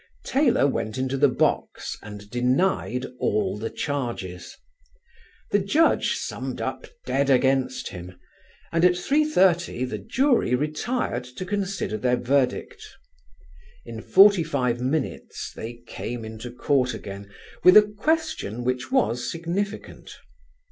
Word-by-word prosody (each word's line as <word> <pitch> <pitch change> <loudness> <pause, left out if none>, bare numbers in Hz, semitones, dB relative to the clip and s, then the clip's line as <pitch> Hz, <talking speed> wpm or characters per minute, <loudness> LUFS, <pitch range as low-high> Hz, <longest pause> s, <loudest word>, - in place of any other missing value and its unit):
Taylor 265 - +3
went 110 -5 -1
into 130 +1 -1
the 145 +1 +4
box - - -1
and 105 -1 -10
denied 125 +1 +1
all 105 -2 0
the 110 +2 -4
charges. 120 - -4 0.9
The 205 - +4
Judge 250 +13 +2
summed - - -5
up - - -4 0.2
dead 140 0 +1
against 130 0 +2
him, 90 -2 -10 0.5
and 165 0 +1
at 180 0 +6
3.30 180 - +2
the 110 -4 -5
jury 240 - +2
retired 150 - -2
to 125 +9 -7
consider 195 - -2
their 125 +2 +2
verdict: 130 +1 0 1.0
in 115 -1 -7
forty 200 - +6
five 125 -6 -1
minutes 135 +3 -3
they 115 +2 -6
came 120 -2 -6
into 110 +2 -7
court 130 +1 0
again 100 0 -8 0.3
with 180 +3 +9
a 210 - +9
question 205 - -1
which 125 +1 -2
was 120 +3 +1
significant. 175 +5 -4
130 Hz, 120 wpm, -24 LUFS, 120-180 Hz, 1.0 s, with